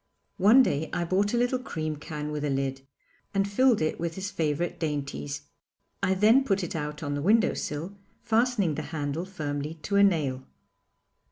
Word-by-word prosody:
One 220 +8 +7
day 155 - -1
I 175 - 0
bought 195 +4 +1
a - - +2
little 245 +1 +1
cream 155 -10 -4
can 150 0 -6
with 150 -1 -3
a 150 - 0
lid, 135 -1 -1 0.5
and 195 0 +2
filled 230 -1 +3
it 155 - -1
with 165 0 -3
his 195 +1 -4
favourite 165 -2 -1
dainties. 145 -2 -3 0.6
I 190 -1 +2
then 220 +7 +5
put 195 -6 0
it 175 - -4
out 150 0 -4
on 145 -1 -2
the 145 - -2
window 220 +7 +4
sill, 160 +7 -4 0.3
fastening 225 -6 +2
the - - -3 0.2
handle 145 +4 -2
firmly 150 -4 -4
to 200 - 0
a 200 - +6
nail. 150 -9 +2
165 Hz, 180 wpm, -27 LUFS, 150-200 Hz, 0.6 s, One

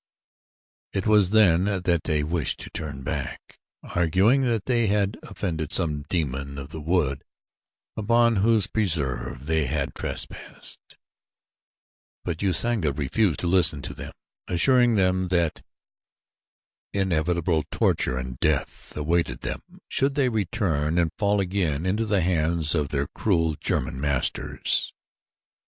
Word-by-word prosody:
It 95 - -2
was 105 -4 +4
then 95 -4 +4
that 90 -4 0
many 75 -1 +1
wished 80 -1 -1
to - - -9
turn 70 -4 -6
back, 70 -2 -5 0.2
arguing 95 - +2
that 115 -6 0
they 120 -3 +2
had 100 0 +1
offended 80 -7 -4
some 75 -5 +1
demon 70 -4 -2
of 70 0 -7
the 80 0 -7
wood 75 -4 0 0.7
upon 115 +1 +3
whose 110 0 +3
preserve 75 - -1
they 80 -2 +1
had - - -2
trespassed; - - -6 1.3
but 85 -2 -3
Usanga 100 -3 +2
refused 80 +6 0
to 90 - -1
listen 85 -5 +3
to 70 -1 -5
them, - - -8 0.4
assuring 120 +6 +4
them 95 -1 +2
that 85 -3 0 1.3
inevitable 85 -3 0
torture 65 - +1
and 65 -1 -6
death - - -1
awaited 85 +3 0
them - - -3 0.3
should 135 +1 +1
they 135 -3 +2
return 90 -8 -1
and 85 -3 +2
fall 100 -1 +2
again 90 -5 -1
into 105 +4 0
the 100 -3 +2
hands 80 -2 +1
of 75 -4 0
their 70 -1 -1
cruel 80 -6 +1
German 65 - -2
masters. 70 -3 +1
85 Hz, 130 wpm, -25 LUFS, 75-100 Hz, 1.3 s, was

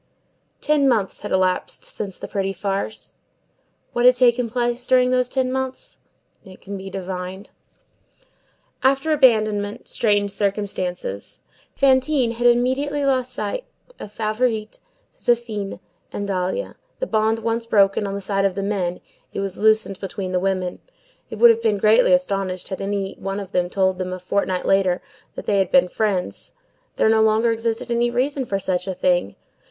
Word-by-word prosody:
Ten 295 -2 +3
months 215 -6 0
had 205 - -6
elapsed 185 -1 0
since 195 -3 -6
the - - -7
"pretty 195 -1 -2
farce." 195 +3 -4 0.8
What 240 - 0
had 250 0 +7
taken 245 -1 +3
place 240 +1 -1
during 255 -1 +4
those 250 -1 +2
ten 260 -1 0
months? 265 - -4 0.4
It 190 -2 -14
can 200 +1 -7
be 195 0 -7
divined. 190 0 -6 1.3
After 275 +4 +2
abandonment, 215 -6 +2
straightened 205 -2 +1
circumstances. 195 - -3 0.3
Fantine 265 -2 +3
had 240 +1 +1
immediately 265 +4 +2
lost 255 -2 +1
sight - - -3 0.4
of 205 - -8
Favourite, 215 0 -1 0.3
Zéphine 225 -4 -1 0.3
and 205 - -4
Dahlia; 185 - -2 0.2
the - - -2
bond 220 - +1
once 230 +1 -2
broken 200 -1 +3
on 195 - -4
the 200 - -4
side 195 0 0
of 195 -2 +1
the 195 - -2
men, 185 -3 -2 0.3
it - - -3
was 195 -1 -3
loosed 215 -3 +2
between 190 -1 -4
the 180 - +1
women; 185 -1 -1 0.5
they - - -6
would 235 +2 +7
have 230 0 -1
been 220 -3 +2
greatly 215 +5 +4
astonished 195 -9 0
had 190 - -5
any 195 -1 -2
one 195 +1 -4 0.2
told 190 -1 +1
them 185 0 -3
a 185 - -5
fortnight 185 0 -1
later, 190 -2 +2 0.4
that - - -7
they 200 -1 +2
had 190 - +1
been 270 -7 +5
friends; 195 -1 -2 0.4
there - - +2
no 220 0 +4
longer 220 +1 +3
existed 225 +1 -2
any 235 0 +2
reason 260 +3 -1
for 200 - -1
such 185 -1 -2
a 190 - -3
thing. 175 - +1
210 Hz, 160 wpm, -22 LUFS, 195-240 Hz, 1.3 s, had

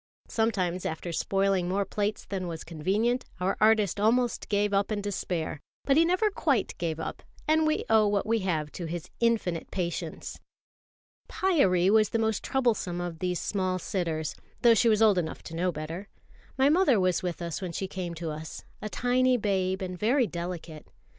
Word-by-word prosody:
Sometimes, 185 -6 0
after 160 +2 -4
spoiling 195 +1 +1
more 195 +2 0
plates 205 +1 -2
than 190 -2 -4
was 165 -2 -5
convenient, 200 +10 0 0.2
our 185 +2 0
artist 215 -3 +4
almost 235 +3 +1
gave 205 0 +1
up 200 +2 +1
in 210 - 0
despair; 180 -6 -3 0.3
but 275 - +4
he 320 - +6
never 370 +5 +2
quite 280 - 0
gave 165 -2 -2
up, - - -5 0.3
and 315 0 +3
we 310 - 0
owe 220 -1 +5
what 205 -1 +1
we 225 +1 +1
have 160 -6 -1
to 175 - -6
his 170 0 -6
infinite 225 -8 0
patience. 175 -3 -4 0.9
Pyârie 195 - +3
was 215 -1 +4
the - - 0
most 220 -2 0
troublesome 225 -9 0
of 175 -2 -4
these 180 -1 -1
small 185 -2 -1
sitters, 170 -5 -2 0.3
though 235 -1 +8
she 230 +1 +4
was 220 0 +4
old 205 -4 +5
enough 160 -2 -4
to 165 - -8
know 180 +2 +1
better. 165 +5 -6 0.5
My 265 +1 +4
mother 300 - +4
was 185 -2 +2
with 180 -2 -3
us 170 +1 -4
when 185 -2 -4
she 190 +3 -3
came 180 -3 -5
to 165 -1 -4
us, 155 0 -7 0.2
a 215 - -4
tiny 250 +2 +2
babe 190 -3 0
and 185 -1 -4
very 245 +4 +3
delicate. 170 -4 -6
195 Hz, 180 wpm, -28 LUFS, 175-225 Hz, 0.9 s, though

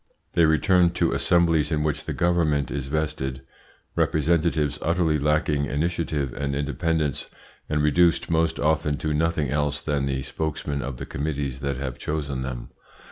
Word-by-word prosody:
They 85 - +5
return 90 +3 +4
to - - +1
assemblies 85 -3 +3
in 75 -1 +1
which 75 -2 -2
the - - -3
Government 80 -6 +1
is 70 -2 -3
vested, 70 -3 -2 0.5
representatives 80 -1 +1
utterly 80 -2 +1
lacking 75 0 +1
initiative 75 -2 -1
and 70 -1 -2
independence, 75 0 -1 0.4
and 75 -1 +1
reduced 85 +2 +3
most 80 0 +1
often 75 -1 +1
to 75 -1 -2
nothing 75 -3 0
else 75 -1 0
than 70 -2 -1
the 65 -1 -2
spokesmen 70 -1 -3
of 65 0 -5
the - - -6
committees 70 -2 -3
that 70 -1 -2
have 65 -2 -5
chosen 70 -4 -3
them. 65 -2 -5
75 Hz, 150 wpm, -25 LUFS, 70-80 Hz, 0.5 s, They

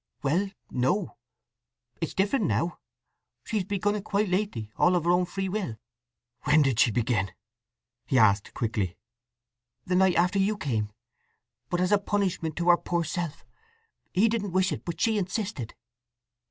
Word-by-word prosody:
"Well, 175 +8 +1 0.2
no—it's 120 - -4
different 205 +4 +2
now. 170 +1 0 0.6
She's 215 -4 -1
begun 205 +1 0
it 210 -2 -3
quite 205 -1 0
lately—all 180 - +1
of 175 - +1
her 170 - +3
own 180 +1 +3
free 190 +2 -3
will." 185 - -3 0.7
"When 150 0 +5
did 130 -5 +1
she - - +6
begin?" 110 -3 0 0.8
he 130 - +2
asked 105 -3 +3
quickly. 105 -6 -1 0.9
"The 180 - 0
night 185 -1 +4
after 180 +3 +3
you 205 +2 +2
came. 110 - -2 0.8
But 175 0 0
as 180 - +1
a 205 - +5
punishment 190 -6 -1
to 175 0 0
her 175 - +7
poor 170 -1 -1
self. 170 -1 -4 0.7
He 200 +5 +4
didn't 210 -4 -1
wish 190 0 +2
it, - - -5
but 170 - -4
she 220 -2 +2
insisted." 190 - -3
175 Hz, 150 wpm, -27 LUFS, 125-195 Hz, 0.9 s, her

